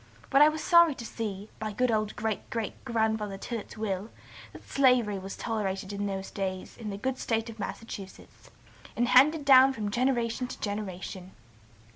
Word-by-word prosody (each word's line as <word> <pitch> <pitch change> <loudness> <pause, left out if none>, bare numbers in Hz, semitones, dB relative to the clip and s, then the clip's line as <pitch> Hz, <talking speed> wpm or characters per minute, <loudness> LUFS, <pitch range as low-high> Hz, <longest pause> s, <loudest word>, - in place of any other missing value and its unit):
But 275 +1 +6
I 300 - +9
was 310 0 -4
sorry 340 -4 +6
to 235 - -8
see, 210 -3 -5
by 215 -1 -4
good 250 +3 +1
old 215 -1 0
great 220 -3 -3
great 225 -2 -4
grandfather 220 -4 0
Tillet's 225 +2 -6
will, 205 -1 -3 0.4
that - - -14
slavery 250 -7 +3
was 195 +1 -7
tolerated 195 -3 -3
in 200 0 -2
those 195 -1 -4
days 190 -2 -4
in 220 -3 -6
the 200 - -4
good 260 +5 -2
State 225 0 -1
of 225 - -15
Massachusetts, 200 -1 -8 0.5
and 240 +1 +1
handed 290 +3 +5
down 265 0 +7
from 210 -4 -3
generation 240 0 0
to - - -8
generation. 190 -2 -5
220 Hz, 170 wpm, -28 LUFS, 200-250 Hz, 0.5 s, I